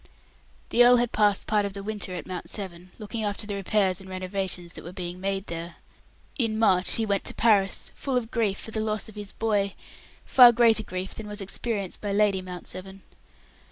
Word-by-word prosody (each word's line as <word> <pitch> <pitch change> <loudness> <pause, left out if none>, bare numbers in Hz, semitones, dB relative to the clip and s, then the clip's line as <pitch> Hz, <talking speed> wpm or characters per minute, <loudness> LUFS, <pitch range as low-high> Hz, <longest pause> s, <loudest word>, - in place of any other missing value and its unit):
The 245 - +5
earl 245 +1 +8
had 240 -1 +1
passed 205 -2 +2
part 210 -1 +2
of 200 -1 -3
the 200 0 -7
winter 205 -3 -4
at 180 - -6
Mount 185 -1 -6
Severn, 185 -3 -6
looking 215 +1 -5
after 205 +1 -2
the 205 - -4
repairs 195 -1 +1
and 190 - -12
renovations 185 -2 -4
that - - -10
were 175 - -8
being 180 0 -6
made 195 0 -2
there. 170 0 -6 0.6
In 225 -3 +1
March 190 -5 +3
he 225 - +1
went 200 -2 0
to - - -4
Paris, 205 -4 +3
full 270 -3 -2
of 230 -2 -3
grief 210 -4 0
for 225 - -9
the 220 - -1
loss 215 0 -2
of - - -12
his 205 -1 -6
boy 205 -3 0 0.5
far 245 -2 +9
greater 230 -1 +4
grief 185 -2 -5
than 220 - -8
was 210 0 -6
experienced 200 0 -3
by 205 -1 -2
Lady 200 -2 +3
Mount 180 -1 -8
Severn. 190 +1 -7
200 Hz, 205 wpm, -26 LUFS, 185-220 Hz, 0.6 s, far